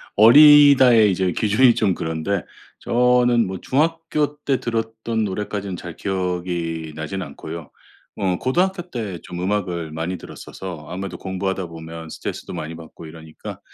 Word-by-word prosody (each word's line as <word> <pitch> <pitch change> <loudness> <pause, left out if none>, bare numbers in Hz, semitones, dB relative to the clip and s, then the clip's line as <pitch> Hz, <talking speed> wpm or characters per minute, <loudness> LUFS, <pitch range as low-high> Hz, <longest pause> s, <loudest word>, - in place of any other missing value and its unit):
어리다의 130 -2 +8
이제 90 -1 0
기준이 115 +3 +4
좀 100 -4 +2
그런데 80 +3 -2 0.4
저는 125 -1 +3
뭐 95 -1 -5
중학교 150 0 0
때 135 -3 +1
들었던 115 -1 -2
노래까지는 100 -1 -4
잘 85 -2 -8
기억이 90 -4 -3
나진 80 +5 -4
않고요. 80 +1 -8 0.5
뭐 95 -3 0
고등학교 180 +7 0
때 105 - -5
좀 90 0 -7
음악을 90 -4 -2
많이 80 +4 -3
들었어서 85 -1 -9
아무래도 95 +3 -5
공부하다 95 -1 -3
보면 80 0 -9
스트레스도 - - -6
많이 80 +1 -5
받고 80 0 -12
이러니까 80 0 -10
95 Hz, 330 characters per minute, -21 LUFS, 85-120 Hz, 0.5 s, 어리다의